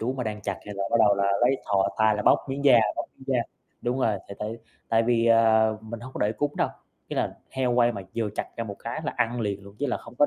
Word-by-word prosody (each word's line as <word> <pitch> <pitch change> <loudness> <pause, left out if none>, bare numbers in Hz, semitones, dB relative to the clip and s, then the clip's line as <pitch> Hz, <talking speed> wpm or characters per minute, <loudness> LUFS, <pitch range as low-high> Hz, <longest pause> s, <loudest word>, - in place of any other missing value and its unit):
chú 120 +3 -1
mà 130 -2 -4
đang 105 -1 -4
chặt 100 - -2
cái 105 - -7
là 100 - -3
bắt - - +4
đầu 105 -2 +6
là 100 0 0 0.2
lấy 125 +3 +4
thò 100 -1 +2
tay 110 -1 +4
là 105 - -2
bóc - - +5
miếng 140 +1 -3
da 130 -4 +8 0.2
bóc - - -2
miếng 130 - -14
da. 130 -2 +2 0.4
Đúng 125 +2 -1
rồi. 110 -5 +1
Thì 100 - -7
tại 110 +2 -4 0.3
tại 115 0 +3
vì, 115 0 +2
à, 110 -1 +5
mình 110 +1 -8
hông 130 +2 -9
có - - -6
để 105 - 0
cúng 145 +5 -2
đâu, - - +2 0.4
ý - - -5
là - - 0 0.2
heo 130 -2 0
quay 120 0 +4
mà 100 - -6
vừa 115 -2 0
chặt - - -5
ra 115 - -2
một 100 -3 -7
cái 115 +5 -5
là - - -2
ăn 120 0 0
liền 100 -3 -2
luôn. 100 0 -13
Chứ 145 - 0
là 125 - 0
không - - -13
có 145 +4 +4
115 Hz, 290 wpm, -26 LUFS, 105-125 Hz, 0.4 s, da